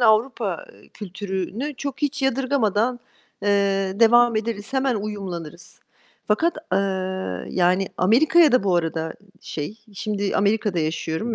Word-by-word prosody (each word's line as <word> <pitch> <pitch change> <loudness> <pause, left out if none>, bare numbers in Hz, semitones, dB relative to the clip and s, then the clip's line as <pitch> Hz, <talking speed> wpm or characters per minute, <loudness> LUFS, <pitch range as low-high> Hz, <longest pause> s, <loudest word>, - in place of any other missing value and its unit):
Avrupa 220 -4 +2 0.3
kültürünü 205 +7 -4
çok 280 +1 -5
hiç 285 -1 -1
yadırgamadan, 250 -3 +1 0.4
eee, 205 - 0 0.5
devam 240 0 +6
ederiz, 215 +1 -3
hemen 265 -2 +1
uyumlanırız. 185 -6 -6 0.5
Fakat, 320 +12 +2 0.2
eee, 190 - +4 0.7
yani, 185 +1 +2
Amerika'ya 300 - +5
da 255 -5 +3
bu 185 -3 +3
arada, 160 -1 -2 0.3
şey, 150 +8 -6 0.2
şimdi 205 0 -2
Amerika'da 205 -2 +1
yaşıyorum 160 +7 -2
210 Hz, 110 wpm, -23 LUFS, 185-245 Hz, 0.7 s, devam